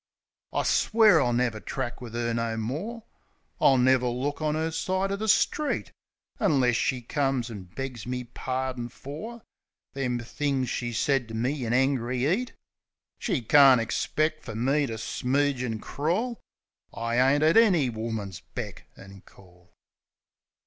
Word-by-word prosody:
I - - 0
swear 215 -7 +4
I'll 125 - +1
never 120 -2 0
track 125 +1 -5
wiv 115 -2 -8
'er 120 0 -1
no 115 -1 -1
more; 165 - -4 0.6
I'll 135 - +5
never 125 0 +4
look 130 +5 -2
on 155 -1 0
'er 160 +1 -1
side 185 +4 -1
o' - - 0
the 215 +2 -4
street 300 +7 +1 0.3
— - - -66
Unless 135 - +3
she 125 -2 0
comes 135 -2 -1
an' 100 -4 -8
begs 130 -4 -5
me 125 0 -3
pardin 130 0 -4
for 210 - -8 0.5
Them 125 -3 -1
things 130 +2 -2
she 120 -1 -2
said 135 +1 +1
to 110 - -7
me 125 +3 -1
in 115 - -2
angry 130 -1 +1
'eat. 235 +10 0 0.7
She 165 - -1
can't 135 +1 +7
ixpeck 155 +7 -1
fer 110 - -8
me 135 +5 +1
to 115 - -5
smooge 135 +4 0
an' 115 -3 -2
crawl. 180 - -2 0.5
I 115 +1 -2
ain't 135 +3 +4
at 160 +1 +4
any 180 - +5
woman's 110 -5 -4
beck - - -8
an' 95 0 -13
call. 90 -2 -20
130 Hz, 155 wpm, -27 LUFS, 120-150 Hz, 0.7 s, can't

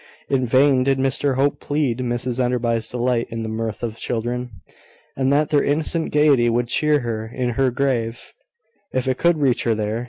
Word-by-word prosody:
In 130 -2 +1
vain 130 +1 +4
did 135 0 +1
Mr 135 +1 0
Hope 140 +2 +1
plead 145 -5 -1
Mrs 125 0 -2
Enderby's 120 -2 -1
delight 120 -1 0
in 115 0 -4
the - - -4
mirth 110 0 -4
of 115 -1 -4
children, 125 +1 -3 0.7
and 135 0 +1
that 145 +1 +2
their 145 -2 +3
innocent 160 +3 0
gaiety 145 -5 +4
would 120 +1 0
cheer 150 0 +2
her 110 -2 -4
in 125 +2 -3
her 130 +2 +1
grave, 120 -3 -2 0.6
if 130 0 -1
it 130 -1 0
could 170 -1 +3
reach 135 -5 +1
her 115 -2 +1
there. 110 +1 -2
125 Hz, 185 wpm, -21 LUFS, 115-140 Hz, 0.7 s, vain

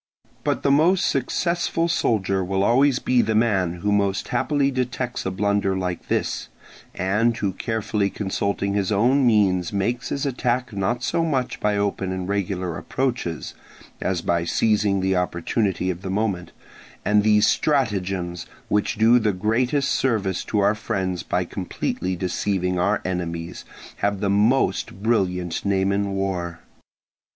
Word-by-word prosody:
But - - -1
the 140 - +3
most 175 +7 +4
successful 170 -1 0
soldier 100 - +1
will 95 +1 0
always 130 +4 +4
be 125 -2 +2
the 110 -1 0
man 95 -6 +1
who 105 - 0
most 100 -1 0
happily 140 +3 +1
detects 125 -3 -2
a - - +1
blunder 100 0 0
like 90 -2 -3
this, - - -1 0.5
and 105 +6 +1
who 100 -3 -1
carefully 105 -1 -1
consulting 100 0 -2
his 100 -1 0
own 125 +6 +3
means 95 -6 +3
makes 115 +5 -1
his 140 0 -2
attack 125 -2 -1
not 110 +5 -1
so 165 - +1
much 135 -6 -1
by 105 -1 +1
open 100 -2 -1
and 95 -1 -3
regular 95 -3 -2
approaches, 120 - -3 0.5
as 90 -3 -1
by 85 -1 +1
seizing 100 +2 +1
the 95 0 +1
opportunity 90 +2 0
of 90 0 -7
the 95 - -5
moment; 95 -4 -1 0.5
and 105 0 +4
these 105 0 +4
stratagems, 95 - 0 0.2
which 105 +2 +1
do 115 +3 +5
the 110 -2 +1
greatest 125 +8 +1
service 105 -8 0
to 105 - 0
our 100 +1 +4
friends 95 -4 -2
by 90 - -1
most 85 - -14
completely 95 -1 -3
deceiving 90 0 -1
our 100 +4 +1
enemies, 85 -2 -4 0.3
have 100 -1 0
the 100 -1 0
most 105 -1 +1
brilliant 90 -6 0
name 95 -1 +1
in 100 0 0
war. 90 -3 -2
100 Hz, 150 wpm, -23 LUFS, 95-120 Hz, 0.5 s, do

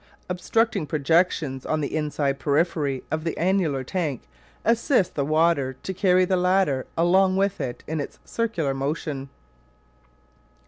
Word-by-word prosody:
Obstructing 195 0 0
projections 150 -2 +1
on 155 - -1
the 145 0 -3
inside 145 -3 -1
periphery 145 -2 0
of 155 0 -1
the 165 - -3
annular 170 -6 +1
tank 150 - -3 0.4
assist 230 - +2
the 140 - -1
water 155 -2 +2
to 190 - -3
carry 185 -1 +3
the 185 - +1
latter 180 -7 +2
along 185 +3 +4
with 195 0 0
it 120 -2 -5
in 160 0 -2
its 145 - -5
circular 215 -12 -1
motion. 140 0 -3
160 Hz, 135 wpm, -24 LUFS, 140-185 Hz, 0.4 s, along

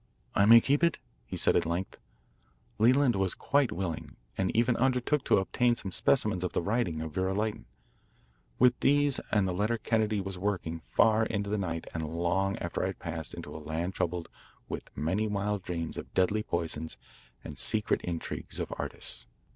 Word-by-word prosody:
"I 100 - +4
may 115 +1 +10
keep 140 +6 +1
it?" 170 -2 +3 0.3
he - - -5
asked - - +2
at - - +4
length. 85 +3 -3 0.8
Leland 125 +3 +4
was 95 -1 0
quite 140 -3 +2
willing 85 -3 -4 0.2
and 95 -1 0
even 120 +1 +3
undertook 130 +3 +1
to - - +4
obtain 120 +5 +2
some 95 -4 -5
specimens 105 -2 +2
of 90 - -2
the - - +1
writing 100 -6 0
of 80 -1 -5
Vera 95 +2 0
Lytton. 105 +1 -2 0.9
With 125 0 +4
these 145 0 +3
and 105 -3 +2
the 90 - -1
letter 105 +5 0
Kennedy 110 -1 +1
was 95 -1 -5
working 90 -4 -2
far 110 +6 +3
into 100 -2 -2
the 105 - +1
night 85 -4 -3
and 80 -2 -3
long 95 +4 +1
after 85 - -3
I - - +1
had 95 - -5
passed 80 -4 -4
into - - -8
a 80 - -7
land 80 +4 -3
troubled 85 -1 -2 0.4
with - - -6
many 95 +8 0
wild 105 0 -1
dreams 85 -3 -4
of - - -10
deadly 95 +3 +2
poisons 80 -4 -3 0.5
and - - -7
secret 110 -1 +1
intrigues 85 -2 -4
of - - -3
artists. - - -3
100 Hz, 180 wpm, -30 LUFS, 85-115 Hz, 0.9 s, may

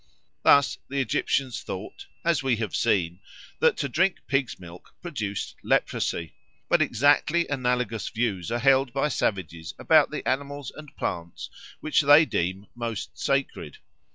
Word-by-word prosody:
Thus 140 -1 +4
the 140 +1 -2
Egyptians 130 0 0
thought, - - -8 0.2
as 165 -4 +2
we 135 -3 +1
have 110 -2 -3
seen, 90 -6 +1 0.4
that - - +3
to 140 - -1
drink 180 +8 +1
pig's 135 -2 -1
milk 85 -1 -13
produced 110 - -4
leprosy. 85 -1 0 0.3
But - - +3
exactly 145 +6 +3
analogous 125 -6 -1
views 110 -7 -2
are 120 - +1
held 135 0 +3
by 140 +2 +1
savages 90 - -2
about - - +4
the - - -5
animals 140 0 -2
and 155 -2 -12
plants 85 0 -5 0.3
which 155 - +2
they 145 +2 +7
deem 95 - -2
most 115 -3 -5
sacred. 135 -1 -2
125 Hz, 140 wpm, -26 LUFS, 100-140 Hz, 0.4 s, they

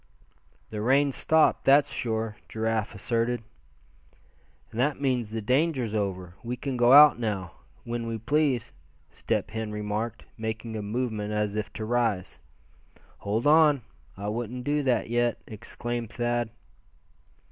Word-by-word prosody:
"The 105 -1 -4
rain's 135 +4 +3
stopped, 160 0 +3
that's 140 +1 +5
sure," 110 -2 -2
Giraffe 110 -1 -1
asserted. 115 +3 -1 1.3
"And 110 - -6
that 140 +3 +1
means 125 -5 0
the 110 0 -4
danger's 130 -2 +1
over. 95 -4 -2
We 120 +1 -3
can 135 0 -3
go 120 0 +4
out 145 -2 +9
now, 100 -6 -2 0.3
when 115 0 -4
we 115 0 -2
please," 135 0 0 0.4
Step - - -2
Hen 110 -1 -4
remarked, 105 +2 -3
making 110 0 -4
a 110 - -3
movement 105 -1 -2
as 105 -1 -1
if 105 -1 -3
to 110 - -5
rise. 115 -5 0 0.8
"Hold 105 +5 -1
on, 150 -3 +5 0.3
I 100 +1 -5
wouldn't 120 +3 -4
do 145 +2 +1
that 130 -3 +1
yet," 120 0 +1
exclaimed 120 +1 -5
Thad. 120 0 -1
115 Hz, 135 wpm, -27 LUFS, 110-125 Hz, 1.3 s, out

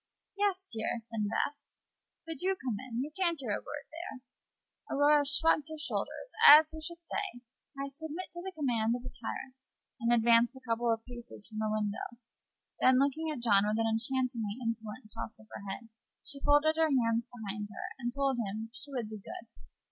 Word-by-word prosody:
"Yes, 395 -2 +1
dearest 225 - -3
and 210 -2 -1
best." 285 +6 -3 0.5
"But 325 -2 -5
do 380 +1 +2
come 250 - -3
in. 240 +2 -1
You 300 - -6
can't 345 -3 +1
hear 250 -6 -2
a - - -1
word 295 -1 -7
there." 320 -6 -7 0.7
Mrs. - - -1
Mellish 290 0 +5
shruggéd 320 -2 +3
her 315 - -6
shoulders, 310 +10 -3
as 305 +2 +10
who 315 0 -8
should 340 +2 -4
say, 390 -10 -3 0.4
"I 275 0 -2
submit 320 +5 -6
to 345 - -6
the 380 +1 -5
command 240 -8 +1
of 245 - -7
a - - -7
tyrant," 260 +3 -6 0.4
and 235 -1 +1
advanced 235 +1 +5
a 260 -1 -14
couple 230 +1 +1
of 225 0 -1
paces 240 -4 -7
from 215 -1 -6
the 215 0 0
window; 215 +2 -2 0.6
then, 255 0 +6
looking 285 +4 +1
at 280 -6 -4
John 200 -3 +6
with 210 +1 +1
an 225 - +2
enchantingly 225 -1 0
insolent 230 -1 -4
toss 230 -1 -6
of 220 - -17
her 200 - -7
head, 225 +4 -6 0.4
she 285 -2 -2
folded 295 +2 +4
her 320 -1 +4
hands 235 -3 +2
behind 210 -3 -5
her, 205 - -6
and 240 -1 -2
told 275 0 0
him 220 +1 -3
she 285 +4 -2
would 245 -5 -2
"be 215 0 -7
good." 230 +3 -9
250 Hz, 195 wpm, -32 LUFS, 225-295 Hz, 0.7 s, as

